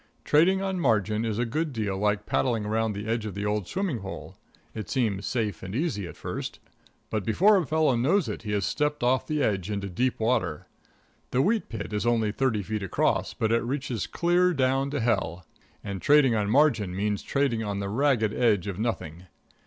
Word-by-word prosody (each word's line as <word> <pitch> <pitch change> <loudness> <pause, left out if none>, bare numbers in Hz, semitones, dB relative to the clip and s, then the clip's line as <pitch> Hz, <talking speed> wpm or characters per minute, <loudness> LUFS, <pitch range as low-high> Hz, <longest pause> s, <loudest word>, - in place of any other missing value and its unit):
Trading 185 +6 +4
on 190 -1 -2
margin 110 - +1
is 110 -2 -2
a 120 - +1
good 155 +6 -2
deal 105 -6 -2
like 105 +1 0
paddling 115 -5 0
around 110 +1 0
the 100 +1 -5
edge 115 -1 -1
of 100 - -7
the 100 +1 -3
old 105 -3 -1
swimming 185 - -2
hole 95 0 -8 0.4
it 105 -5 -6
seems 105 -7 0
safe 110 -8 -2
and 95 +2 -6
easy 130 - -1
at - - -11
first, - - -5 0.5
but 110 -2 -1
before 190 - +4
a 180 -7 +1
fellow 155 -4 +2
knows 155 +10 +2
it - - -4
he 105 -2 -5
has 100 -2 0
stepped 150 -2 -1
off 130 +1 +2
the 150 -2 0
edge 100 -2 0
into 100 -1 -3
deep 125 +8 -1
water. 95 -10 0 0.6
The 130 +2 +2
wheat 220 +2 +1
pit 110 -2 -6
is 105 +3 -1
only 115 -3 +2
thirty 110 -3 0
feet 105 +2 -3
across, 95 - 0
but 110 0 0
it 115 0 +3
reaches 130 -3 -3
clear 175 +1 +2
down 135 +1 +1
to 145 0 -2
Hell. 95 -7 -1 0.4
And 100 -2 -5
trading 145 -4 +5
on 105 -2 0
margin 115 -8 +3
means 105 +1 -1
trading 135 -5 0
on 100 -2 -3
the 100 0 -3
ragged 115 -1 +1
edge 110 -7 +2
of 100 -2 -4
nothing. 90 -6 -3
115 Hz, 200 wpm, -27 LUFS, 105-140 Hz, 0.6 s, trading